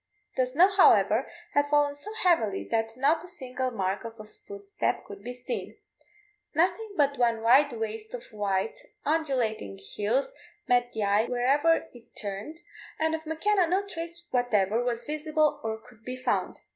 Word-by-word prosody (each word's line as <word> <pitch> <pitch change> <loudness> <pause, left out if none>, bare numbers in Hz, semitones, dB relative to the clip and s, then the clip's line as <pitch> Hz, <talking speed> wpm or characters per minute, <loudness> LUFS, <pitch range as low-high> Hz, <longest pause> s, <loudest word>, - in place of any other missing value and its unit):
The 255 -1 +2
snow, 310 +9 +5
however, 230 - +4 0.2
had 285 0 +3
fallen 290 0 +3
so 290 +9 -8
heavily 230 - +2
that 225 0 0
not 305 +5 +2
a - - -10
single 260 -7 -4
mark 195 -4 -2
of 230 -1 -8
a 215 - -8
footstep 200 -1 -4
could 200 0 -10
be 245 - -5
seen. 250 - -5 0.8
Nothing 370 +6 +1
but 280 -2 +2
one 230 -2 +2
wide 275 +5 +6
waste 220 0 -4
of 240 - -8
white 200 0 -1 0.3
undulating 260 -10 -1 0.2
hills 245 - 0 0.3
met 245 0 +3
the 220 - -1
eye 205 +2 +3
wherever 275 +7 +2
it 240 -2 -17
turned, 205 +9 -5 0.4
and 320 0 +1
of 320 0 -4
M'Kenna 360 +4 +2
no 385 +3 +1
trace 340 -2 -7
whatever 230 -3 +2
was 240 -1 -2
visible 305 0 0
or 220 0 -2
could 230 0 -19
be 250 +2 -5
found. 255 - -1
250 Hz, 160 wpm, -28 LUFS, 220-315 Hz, 0.8 s, wide